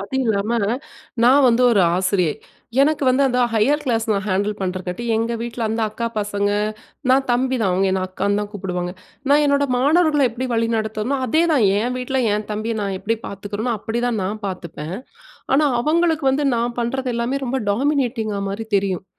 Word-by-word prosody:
அது 200 +6 -4
இல்லாம, 210 -1 0 0.7
நான் 265 +2 +6
வந்து 240 +2 +3
ஒரு 205 - +4 0.2
ஆசிரியை. 185 -4 +1 0.5
எனக்கு 300 0 +1
வந்து 260 +2 +3
அந்த 250 -1 0
ஹையர் 275 +7 +2
கிளாஸ் 230 -3 0
நான் 200 -1 0
ஹேண்டில் 205 +2 0
பண்றக்காட்டி, 185 +3 -3
எங்க 230 +1 -1
வீட்ல 235 0 -5
அந்த 225 +1 -2
அக்கா 230 +2 -3
பசங்க 205 0 -1 0.6
நான் 270 +1 +3
தம்பி 255 +1 +1
தான். 195 -4 +2
அவுங்க 190 +1 +2
என்ன 190 0 0
அக்கான்னு 200 +2 -1
தான் 205 0 -5
கூப்பிடுவாங்க. 180 -3 -4 0.4
நான் 295 +1 +5
என்னோட 280 0 +2
மாணவர்கள்ல 295 0 +3
எப்பிடி 255 +3 -4
வழிநடத்தறனோ! 225 +2 -1
அதேதான் 315 -4 +3
என் 245 +4 -1
வீட்ல 260 +1 -1
என் 210 0 -3
தம்பிய 220 +2 -2
நான் 195 -1 -2
எப்பிடி 225 +3 -1
பாத்துக்கிறனோ! 205 +4 -4
அப்பிடிதான், 230 +1 -1
நான் 215 +3 -4
பார்த்துப்பேன். 170 -2 -6 0.6
ஆனா, 295 +2 +4
அவுங்களுக்கு 320 +1 +1
வந்து 280 +2 0
நான் 235 +1 -2
பண்றது 255 +2 -2
எல்லாமே 245 +4 -1
ரொம்ப 265 +2 -1
டாமினேட்டிங்கா 240 -4 0
மாரி 215 +3 -5
தெரியும் 190 -2 -1
230 Hz, 165 wpm, -21 LUFS, 200-265 Hz, 0.7 s, நான்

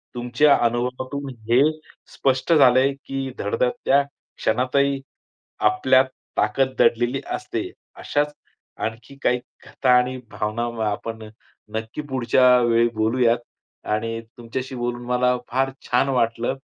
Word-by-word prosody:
तुमच्या 125 +4 +3
अनुभवातून 130 +4 -2 0.2
हे 120 +3 +5 0.5
स्पष्ट 130 +5 +1
झालंय 130 -2 +5
की 135 -1 -3
धडधडत्या 125 +6 +1 0.4
क्षणातही, 135 +2 +1 0.6
आपल्यात 130 +5 +4 0.3
ताकद 130 -1 +1
दडलेली 120 +3 +2
असते. - - -4 0.3
अशाच 150 0 -1 0.5
आणखी 115 +5 -5
काही 125 - +2 0.3
कथा 130 - -2
आणि 125 +1 0
भावना 110 +2 -2 0.3
आपण 110 +2 -5 0.5
नक्की 110 +6 -4
पुढच्या 125 0 +4
वेळी 115 0 +3
बोलूयात 115 +2 +2 0.5
आणि 115 +2 -1 0.2
तुमच्याशी 130 +3 -5
बोलून 120 0 -3
मला 125 0 +2
फार 135 +2 +1 0.2
छान 130 +3 +2
वाटलं. 120 0 0
125 Hz, 110 wpm, -23 LUFS, 115-135 Hz, 0.6 s, हे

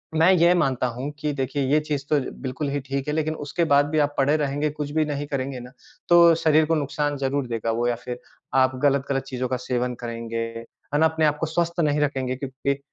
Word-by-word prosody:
मैं 165 +4 +5
ये 175 0 +5
मानता 130 -7 +1
हूँ 125 +4 -4
कि 150 0 -1
देखिए 135 +1 -2
ये 150 - +5
चीज़ 150 -2 -3
तो 150 - +3 0.2
बिल्कुल 135 +2 -3
ही 145 +1 -1
ठीक 135 +1 -4
है, 150 - -1
लेकिन 155 0 -1
उसके 170 +4 -1
बाद 145 0 +6
भी 155 0 +1
आप 145 0 +1
पड़े 140 +2 +3
रहेंगे, 145 +1 -1
कुछ 150 -1 -5
भी 155 +1 +1
नहीं 145 -1 -3
करेंगे 135 -2 -3
ना, 125 +1 -10 0.4
तो 170 -1 +7
शरीर 155 -1 +3
को 165 +1 +1
नुकसान 145 0 -1
ज़रूर 135 -1 -1
देगा 115 -1 -2
वो 120 +2 0
या 120 - +1
फिर 125 +1 -7 0.4
आप 130 0 +3
गलत-गलत 140 -1 +1
चीज़ों 130 -1 -3
का 130 - -1
सेवन 125 0 -2
करेंगे 115 -1 -5 0.6
है 145 - +2
ना 160 - +5
अपने 160 0 +2
आप 150 0 +2
को - - 0
स्वस्थ 170 +2 -1
नहीं 150 -2 +2
रखेंगे 130 -3 -1
क्योंकि 135 +1 -3
140 Hz, 225 wpm, -24 LUFS, 130-150 Hz, 0.6 s, तो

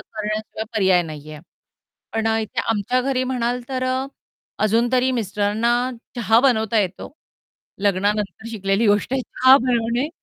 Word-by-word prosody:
करण्याशिवाय 215 0 -5
पर्याय 190 -4 +3
नाहीये. 155 -1 -9 0.7
पण 225 0 -1
अ, 225 - +2
इथे 215 - -3
आमच्या 225 +4 0
घरी 260 -1 0
म्हणाल 250 -1 -1
तर 260 -1 -3
अ, 260 +1 -1 0.6
अजून 230 +3 +2
तरी 255 0 +3
मिस्टरांना 215 0 0 0.4
चहा 225 -1 +3
बनवता 225 -4 +2
येतो. 190 +7 -4 0.7
लग्नानंतर 205 +2 -1
शिकलेली 195 0 0
गोष्ट 205 +4 +2
आहे 265 - +1
चहा 260 +2 +5
बनवणे 240 +2 0
225 Hz, 135 wpm, -21 LUFS, 205-250 Hz, 0.7 s, चहा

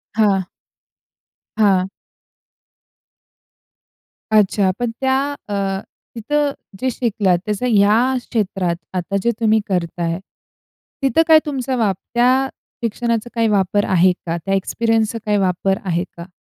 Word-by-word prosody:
हां. 200 -4 +2 1.1
हां. 195 -4 +3 2.4
अच्छा. 205 -2 +3
पण 240 -1 -1
त्या 265 0 +2 0.3
अ, - - -3 0.6
तिथं 290 +6 0 0.3
जे 260 - 0
शिकलात 205 -7 +1
त्याचं 210 +3 -2
ह्या 220 +4 +4 0.2
क्षेत्रात, 190 -6 -1 0.2
आता 185 +2 -3
जे 235 - +3
तुम्ही 220 -1 +3
करताय. 170 -2 -2 0.8
तिथं 270 +3 +3
काय 320 -1 +8
तुमचा 265 -3 -2
वापर 205 -6 0 0.2
त्या 255 +3 +3 0.4
शिक्षणाचा 235 0 -1
काय 230 -1 +2
वापर 205 -1 +2
आहे 185 0 +5
का? 170 0 -2
त्या 195 - 0
एक्सपिरियन्सचा 225 +3 0
काही 210 -1 +2
वापर 190 0 +1
आहे 175 -1 0
का? 170 +1 -8
210 Hz, 115 wpm, -19 LUFS, 190-235 Hz, 2.4 s, काय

